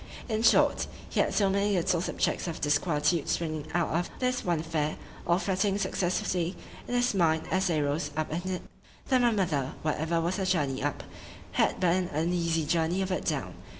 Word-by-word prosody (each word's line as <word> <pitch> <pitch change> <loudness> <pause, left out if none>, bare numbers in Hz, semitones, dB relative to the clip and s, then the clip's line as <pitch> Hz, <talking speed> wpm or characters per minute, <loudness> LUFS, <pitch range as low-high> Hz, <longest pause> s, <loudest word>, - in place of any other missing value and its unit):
In 220 -2 -1
short, - - +4 0.2
he - - 0
had - - +3
so 200 - +2
many 200 +1 +1
little 170 -1 +1
subjects 180 - -1
of 165 - -4
disquietude 150 +1 +1
springing 155 -3 -2
out 175 -1 +2
of 170 +3 -1
this 250 -1 0
one 170 -3 0
affair, 155 -2 -1 0.3
all 170 0 +4
fretting 195 +1 0
successively 180 -2 -1 0.3
in 245 - -2
his 245 -1 +2
mind 160 -4 +2
as 190 0 +2
they 155 -4 +1
rose 145 +4 -1
up 155 -1 -1
in 175 +4 -3
it, 180 - -3 0.5
that 255 -1 +4
my 240 - +5
mother, 165 - 0
whatever 160 +2 0
was 170 +4 -1
her 190 - -1
journey 145 -8 0
up, 145 0 -2 0.5
had - - +1
but 180 -2 +3
an 180 -1 0
uneasy 165 0 0
journey 170 +4 +1
of 190 - -3
it 185 - -2
down. - - -2
175 Hz, 190 wpm, -29 LUFS, 160-190 Hz, 0.5 s, my